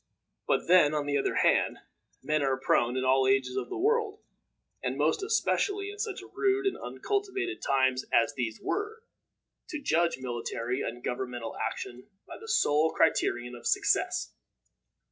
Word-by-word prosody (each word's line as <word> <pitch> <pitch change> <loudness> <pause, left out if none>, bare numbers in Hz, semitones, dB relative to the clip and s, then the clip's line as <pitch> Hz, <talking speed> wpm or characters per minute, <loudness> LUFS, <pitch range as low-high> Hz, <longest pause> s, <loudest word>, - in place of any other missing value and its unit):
But - - +1
then, 165 -4 +5
on 150 -1 -1
the 145 -1 +1
other - - -1
hand, - - +3 0.5
men 155 0 +1
are 135 -1 +1
prone, 125 -1 +1
in 130 - 0
all 130 0 +4
ages 130 -1 +2
of - - -3
the 380 - -4
world, 430 +2 +1 0.6
and - - -2
most - - +1
especially 400 -1 0
in 415 - -12
such 425 -3 -3
rude 395 0 +1
and 390 - +1
uncultivated 390 -3 -3
times 130 -1 +2
as 115 - +3
these 115 -4 -3
were, 425 +3 -3 0.7
to 305 - -4
judge 170 - +1
military 120 0 -3
and 120 +1 -5
governmental 125 -2 -4
action 120 +2 -5 0.2
by - - -10
the 450 - -11
sole 160 - +3
criterion 120 -6 +1
of 120 -1 -6
success. - - +1
145 Hz, 155 wpm, -29 LUFS, -, 0.7 s, then